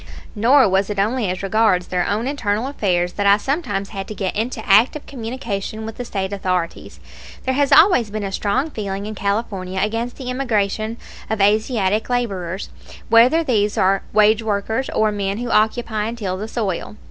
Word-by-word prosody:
Nor 245 +4 +5
was 195 +1 +1
it 205 - -3
only 215 +1 0
as 185 +1 -4
regards 195 -3 +2
their 180 -1 -1
own 215 +3 -1
internal 235 -5 -1
affairs 180 -10 0
that 200 -1 0
I 200 +1 +6
sometimes 215 - -2
had 195 -2 -6
to 215 - -7
get 190 -2 -3
into 220 +1 -3
active 230 +9 +4
communication 225 -4 -5
with 225 0 -7
the 245 - -5
State 195 -3 -3
authorities. 185 -3 -3 0.4
There 260 - 0
has 280 +1 +1
always 315 - +6
been 215 0 -4
a 195 - -3
strong 255 +11 -1
feeling 200 -3 -4
in 215 - -5
California 200 -2 -2
against 225 +4 -2
the 255 -2 -5
immigration 220 -3 -1 0.3
of 220 - -1
Asiatic 210 0 +1
laborers, 195 -7 -2 0.4
whether 245 +9 +5
these 210 -7 +1
are 195 +1 +3
wage 215 +1 +4
workers 220 +4 -2
or 215 -1 +1
men 200 -1 -2
who 240 0 -4
occupy 220 0 +1
and 230 +2 -4
till 190 -5 -3
the 205 +3 -5
soil. 210 -4 -3
215 Hz, 180 wpm, -20 LUFS, 195-235 Hz, 0.4 s, I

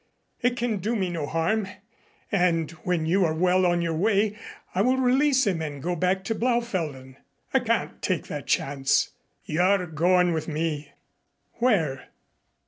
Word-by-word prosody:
"It 245 0 +1
can 235 -3 0
do 215 +5 -2
me 190 -4 -1
no 160 -4 -3
harm, 190 +7 0 0.6
and 175 -5 +1
when 175 -3 0
you 185 +4 +2
are 160 -2 +1
well 180 +2 +3
on 175 -1 +1
your 165 -1 -1
way, 205 +4 +1 0.4
I 185 - +1
will 255 +4 +3
release 260 +1 +3
him 180 -5 0
and 145 -3 -5
go 175 +5 -2
back 185 +3 0
to 225 - -1
Blaufelden." 185 - -2 0.4
"I - - +5
can't - - -1
take - - -1
that - - -6
chance. 135 -1 +1 0.3
You're 180 +4 +2
going 175 +2 +2
with 160 -1 -3
me." 155 -2 -3 0.7
"Where?" 165 - +1
180 Hz, 155 wpm, -25 LUFS, 160-215 Hz, 0.7 s, I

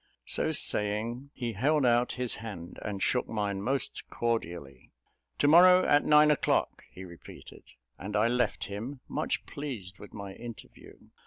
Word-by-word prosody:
So - - +1
saying, 115 +6 0
he 120 -4 -4
held 140 +7 +1
out 120 0 +2
his 125 -2 -3
hand, 100 -6 -8
and 100 -2 -4
shook 125 - 0
mine 100 -3 -2
most 130 0 -2
cordially. 85 - -4 0.5
"To 145 - +2
morrow, 180 +4 +7
at 145 0 +4
nine 150 0 +5
o'clock," 150 - 0
he 95 - -10
repeated; 85 -2 -13 0.4
and 105 +3 -6
I 105 +2 +3
left 125 +1 0
him, 115 +7 -6
much - - -2
pleased 110 -11 -7
with 105 - -12
my 100 -2 -8
interview. 115 +1 -12
115 Hz, 150 wpm, -29 LUFS, 100-135 Hz, 0.5 s, morrow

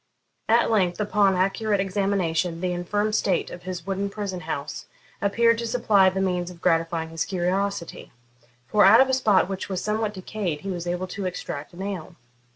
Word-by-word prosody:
At 230 +1 +4
length, 185 -4 +1
upon 205 -2 +2
accurate 195 +3 +1
examination, 185 -4 0
the 180 0 -1
infirm 205 +5 -1
state 195 -4 0
of 175 - -8
his 180 -2 -6
wooden 195 +1 -2
prison 200 -3 -4
house - - -5 0.3
appeared 230 +3 +3
to 235 - -3
supply 215 -5 +4
the 190 +1 -3
means 180 -2 0
of 175 -2 -12
gratifying 165 -1 0
his 165 -1 -2
curiosity, 185 0 -2 0.5
for 210 +7 +3
out 200 +5 +8
of 265 0 +5
a - - +1
spot 215 -9 +3
which 195 0 -5
was 185 -2 -3
somewhat 215 0 -1
decayed 185 -5 -4
he 195 - -4
was 175 -1 -5
able 175 +1 -2
to 195 0 -3
extract 155 -4 -6
a - - -13
nail. 190 -4 -5
190 Hz, 180 wpm, -25 LUFS, 175-205 Hz, 0.5 s, out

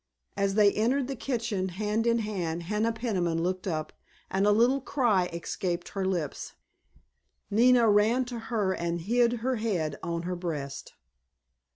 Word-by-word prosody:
As 200 -1 0
they 210 -1 +6
entered 245 +5 +1
the 270 - -4
kitchen 225 -7 -2
hand 210 +5 -1
in 235 0 +3
hand 180 -7 -3
Hannah 210 +5 0
Peniman 185 -8 -1
looked 185 +2 -2
up, 155 -3 -3 0.4
and 195 +2 +2
a - - +6
little 240 +6 +3
cry 225 -10 +1
escaped 170 +1 -4
her 195 -1 -3
lips. 170 -7 -3 1.0
Nina 240 +2 +5
ran 220 +5 +3
to 240 -1 -6
her 210 -5 +1
and 170 -1 -2
hid 235 +5 +2
her 260 -1 +1
head 180 -10 -2
on 170 0 -3
her 180 +1 -3
breast. 145 -6 -5
205 Hz, 155 wpm, -28 LUFS, 175-230 Hz, 1.0 s, they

